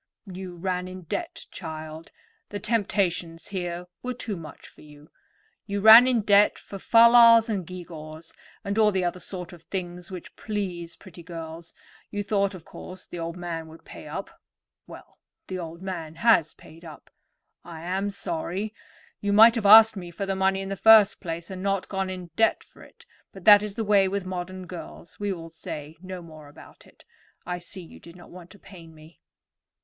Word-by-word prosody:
"You 185 -2 -8
ran 180 +1 -3
in 185 0 -9
debt, 330 - -5
child; 160 -1 -8 0.4
the 205 - -5
temptations 190 -6 -1
here 175 -2 -4 0.2
were 250 0 -4
too 225 -4 -4
much 160 -4 -11
for - - -19
you. 150 0 -16 0.6
You 200 0 -2
ran 220 +4 +9
in 245 -3 +2
debt 205 0 +4
for 195 - -10
fal 230 +3 +6
lals 230 -1 +7
and 195 -6 -2
gew 180 -1 -8
gaws, 155 0 -10 0.3
and 200 +1 -2
all 215 -1 +5
the 190 -2 0
other 175 +1 -2
sort 180 -1 -7
of 170 - -13
things 175 0 -6
which 185 -2 -9
please 185 -6 -5
pretty 180 -3 -14
girls; 165 0 -9 0.3
you 205 0 -3
thought, 200 -1 0
of 170 - -12
course, 185 0 -11
the 175 - -8
old 165 +1 -5
man 170 -2 -5
would 160 +1 -15
pay - - -11
up. - - -6 0.6
Well, - - -14 0.3
the 185 -1 -5
old 170 +1 -8
man 165 -5 -6
has 170 -5 +3
paid 165 +2 -16
up. 155 -3 -13 0.5
I 165 -2 -10
am 190 +4 -2
sorry. 195 +2 -4 0.5
You 205 - -1
might 220 +3 +8
have 225 -4 0
asked 220 +1 +9
me 180 -3 -7
for 175 +4 -5
the 195 0 -2
money 190 0 +1
in 195 - -6
the 195 - -3
first 220 0 +6
place, 170 0 -6
and 185 -1 -6
not 195 -1 -1
gone 190 -1 -2
into 180 -3 -8
debt 225 - +2
for - - -20
it; - - -17 0.3
but 190 -2 -13
that 205 -1 +9
is 210 -1 -5
the 225 - -2
way 200 -2 +4
with 195 0 -3
modern 185 0 -6
girls. 170 -1 -11
We 205 -1 -2
will 165 -3 -7
say 155 -1 -8
no 185 -1 -8
more 155 -3 -13
about 145 - -16
it. - - -22 0.4
I 180 0 -4
see 180 +1 -7
you 165 - -14
did 170 0 -14
not 180 - -15
want 180 -1 -12
to 205 - -14
pain 170 -5 -14
me." 155 +2 -17
185 Hz, 195 wpm, -25 LUFS, 170-200 Hz, 0.6 s, ran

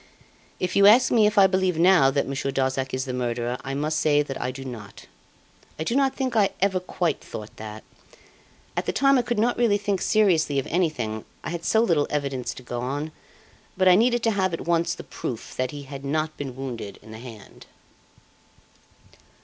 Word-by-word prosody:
If 180 - -2
you 200 0 +7
ask 245 +5 +6
me 220 -3 +5
if 210 0 -2
I 195 - +8
believe 185 -2 +1
now 175 -5 +5
that 140 +1 0
Monsieur 135 0 -2
Darzac 130 -1 -1
is 130 0 -2
the 130 - -4
murderer, 120 0 -2
I 135 0 -4
must 155 +2 -1
say 150 -1 +3
I 125 - -2
do 135 +1 -7
not. 110 -6 -9 0.7
I 155 - -2
do 230 - -1
not 270 -1 +2
think 260 -3 -2
I 205 -3 +4
ever 190 -1 +2
quite 175 -3 -2
thought 105 0 -9
that. 110 0 -8 0.9
At - - -2
the - - 0
time 275 -1 +4
I - - +3
could 240 -1 -2
not 235 +3 +1
really 225 -4 +3
think 200 -2 -2
seriously 175 -9 +2
of 135 - 0
anything. 125 - -1 0.2
I - - -4
had 170 -1 -5
so 220 +5 +3
little 165 -10 +2
evidence 140 -4 -2
to 130 - -11
go 120 0 -4
on. 145 +5 -3 0.7
But 185 0 +3
I 180 - +8
needed 240 +4 +3
to 225 - +3
have 190 -4 0
at - - -8
once 170 0 0
the - - -9
proof 115 - -6
that 130 0 -1
he 145 +1 -7
had 140 0 -9
not 155 +2 -1
been 135 -3 -6
wounded 125 -6 -6
in 110 - -13
the 110 - -9
hand. 115 -4 -12
155 Hz, 205 wpm, -25 LUFS, 130-195 Hz, 0.9 s, I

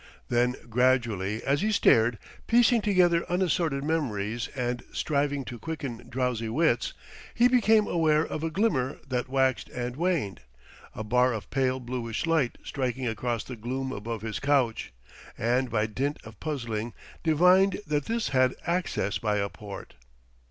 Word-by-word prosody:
Then 125 +1 +2
gradually 115 -4 +1
as 140 +3 +1
he 215 +2 +1
stared, 115 - +4 0.3
piecing 235 0 +4
together 180 -5 +3
unassorted 170 -6 +1
memories 120 -8 -1
and 125 -2 -2
striving 145 -2 -1
to 120 -1 -7
quicken 140 -7 -6
drowsy 125 -3 -1
wits, 125 -1 +1 0.4
he 240 +1 +5
became 225 -4 +4
aware 160 -3 +2
of 155 - -5
a 165 - 0
glimmer 160 - 0
that 125 -1 -2
waxed 130 -1 +1
and 125 0 -4
waned, 165 - -1 0.5
a 110 - -4
bar 125 +3 +3
of 110 - -6
pale 130 -1 +1
bluish 120 +1 -3
light 160 -7 +1
striking 130 -1 -2
across 115 0 -2
the 125 - -7
gloom 130 +4 -4
above 110 -1 -5
his 110 -1 -3
couch; 135 -5 +1 0.5
and 125 +3 +1
by 105 -2 +1
dint 135 +7 -2
of 110 -2 -13
puzzling 120 -7 -3 0.3
divined 180 +5 +4
that 150 -2 -1
this 230 0 -1
had 130 -1 +3
access 170 - -1
by 105 -2 0
a 100 0 -1
port. 100 -2 -9
130 Hz, 150 wpm, -27 LUFS, 115-160 Hz, 0.5 s, he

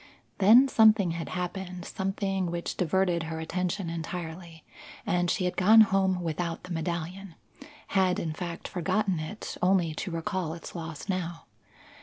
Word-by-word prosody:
Then 225 +7 +7
something 215 -7 +5
had 165 0 -4
happened, 180 0 -4
something 195 -2 -2
which 170 0 -3
diverted 180 0 +1
her 160 0 -4
attention 180 +3 -2
entirely, 165 0 -6 0.4
and 180 -4 +1
she 185 - 0
had 180 - -1
gone 215 +4 +7
home 190 -3 +2
without 165 +1 -3
the 180 -1 -6
medallion; 170 +2 -4 0.5
had, 190 -2 +2
in 160 -2 -2
fact, 170 0 -6
forgotten 185 +1 0
it, 155 +8 -6
only 180 -3 +3
to 185 - -4
recall 165 -1 -3
its 165 - -10
loss 160 -2 -7
now. 175 -3 -3
180 Hz, 145 wpm, -28 LUFS, 165-190 Hz, 0.5 s, Then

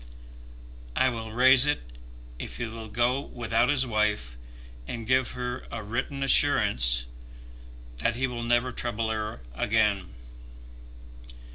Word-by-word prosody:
"I 130 - +3
will 115 -2 -6
raise 130 +3 +6
it 145 - +1 0.6
if - - -7
he 120 - -3
will 110 0 -8
go 120 +5 +1
without 120 -2 -1
his 140 -2 +2
wife, 105 - -1 0.5
and 115 -2 -5
give 130 +1 +1
her 125 0 -5
a 110 -2 -5
written 120 +6 -3
assurance 100 - +4 0.9
that 115 - 0
he 130 +2 0
will 125 -2 -4
never 120 +2 +1
trouble 115 -2 -2
her 110 - -4
again." 105 - +1
120 Hz, 125 wpm, -27 LUFS, 110-125 Hz, 0.9 s, raise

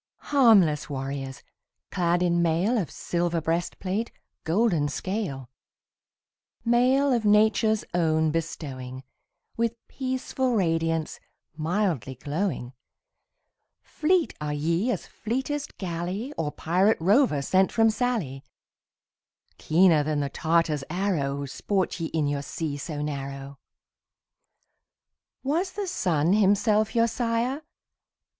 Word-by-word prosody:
Harmless 200 - +5
warriors, 135 0 -5 0.5
clad 175 -1 +1
in 175 -1 +2
mail 170 +8 +2
Of 180 - -3
silver 175 -1 -1
breastplate, 180 +6 -2 0.3
golden 170 -3 +2
scale; 175 - -4 1.2
Mail 255 +4 +3
of 235 -2 +1
Nature's 215 +1 +3
own 160 -2 +2
bestowing, 135 -5 -5 0.5
With 230 0 0
peaceful 260 -1 -2
radiance, 165 -4 0 0.4
mildly 160 - -1
glowing 145 -2 -3 1.1
Fleet 345 +1 +1
are 150 -1 -2
ye 165 - 0
as 210 -8 -2
fleetest 265 +6 -4
galley 185 - -4
Or 150 -2 -2
pirate 185 +9 +2
rover 190 - +3
sent 190 +6 +3
from 225 -1 +4
Sallee; 215 - -2 1.2
Keener 165 -1 +4
than 150 0 -1
the 140 - -2
Tartar's 160 -2 +1
arrow, 155 -7 -1
Sport 190 +7 -2
ye 165 - -2
in 160 -2 -1
your 145 0 -1
sea 150 +1 -4
so 145 +1 -5
narrow. 140 -1 -6 1.8
Was 335 +8 0
the 410 0 -3
sun 175 - +1
himself 210 +2 +3
your 230 0 +5
sire? 235 +4 -1
175 Hz, 105 wpm, -26 LUFS, 150-225 Hz, 1.8 s, Harmless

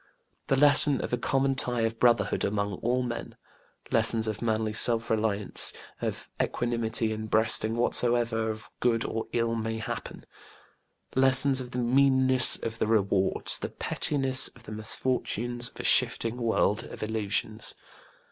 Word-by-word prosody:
The 135 - +2
lesson 145 0 +5
of - - -5
a - - +2
common 135 +2 0
tie 125 -2 0
of 115 0 -2
brotherhood 120 -4 +2
among 100 0 -2
all 125 +2 0
men. 120 -1 -6 0.6
Lessons 110 -1 +2
of 110 -2 -4
manly 110 -2 -1
self 115 +1 +3
reliance, 105 -2 0 0.3
of - - -4
equanimity 115 -2 -1
in 110 0 -5
breasting 110 0 +2
whatsoever 120 -1 +1
of 110 0 -7
good 115 -2 +1
or 115 - -4
ill 115 -1 -1
may 110 0 -3
happen. 110 - -7 0.9
Lessons 135 0 +4
of 125 - -8
the 125 - -7
meanness 130 +1 +3
of 115 0 -6
the - - 0
rewards, 100 -3 0
the - - -5
pettiness 135 -2 0
of 120 - -18
the 110 - -11
misfortunes 120 +2 0
of - - -17
a - - -5
shifting 115 +1 +2
world 110 -3 0
of - - -9
illusions. 110 0 -1
115 Hz, 145 wpm, -27 LUFS, 110-125 Hz, 0.9 s, lesson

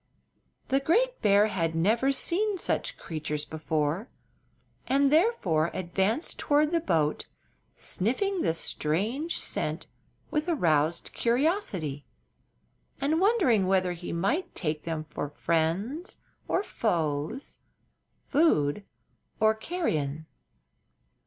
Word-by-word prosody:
The 270 - +3
great 475 - +1
bear 205 0 +5
had 165 -6 -1
never 225 +11 +2
seen 395 +8 0
such - - -1
creatures 150 -2 -4
before, 160 - -2 0.8
and 275 +1 +3
therefore 295 - +3
advanced 190 - -1
toward 300 +1 +3
the 340 - +2
boat, 160 - 0 0.5
sniffing 355 - -1
the 165 - +1
strange 215 - -1
scent - - -2 0.5
with 305 +2 0
aroused 165 - +1
curiosity 235 - 0 1.0
and 310 +4 +1
wondering 350 - +3
whether 185 -1 +2
he 175 0 -7
might 200 - -1
take 155 -3 -2
them 160 -2 -3
for 150 -1 -5
friends 170 - -1 0.3
or 390 - +1
foes, 160 - -2 0.7
food 205 - +2 0.6
or 220 0 +5
carrion. 160 - -2
200 Hz, 100 wpm, -28 LUFS, -, 1.0 s, bear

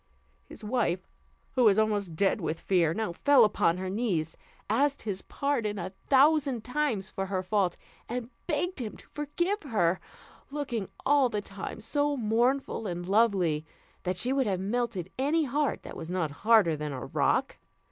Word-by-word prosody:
His - - -12
wife, 210 -6 0 0.4
who 255 -2 +3
was 205 -2 +6
almost 205 -5 +1
dead 195 +4 +2
with 160 0 -2
fear, 175 -4 +2
now 215 0 -2
fell 275 +8 +5
upon 175 -4 +2
her 185 0 -4
knees, 185 -6 -1 0.3
asked 280 +6 +1
his 200 -3 -3
pardon 240 -8 -1
a 185 0 -4
thousand 275 +2 +3
times 250 -7 -1
for 195 0 -3
her 185 -1 -1
fault, 185 -2 +1 0.3
and 245 +1 -4 0.2
begged 350 +2 -1
him 220 -5 -5
to - - -17
forgive 345 +7 -1
her, 190 - +1 0.5
looking 265 -8 -3 0.2
all 280 -2 +4
the 210 - -1
time 200 +2 -7
so 290 +5 0
very 235 -5 -4
mournful 240 0 +1
and 175 -1 -4
lovely, 190 -7 +3 0.4
that 180 -1 -2
she 250 +7 0
would 270 -3 +1
have 190 -3 0
melted 200 -3 -2
any 305 +4 +2
heart 290 +1 -1
that - - -8
was 165 - -7
not 175 -4 -1
harder 210 -7 +5
than 150 -1 -4
a 130 - -5
rock. - - 0
215 Hz, 170 wpm, -29 LUFS, 185-270 Hz, 0.5 s, was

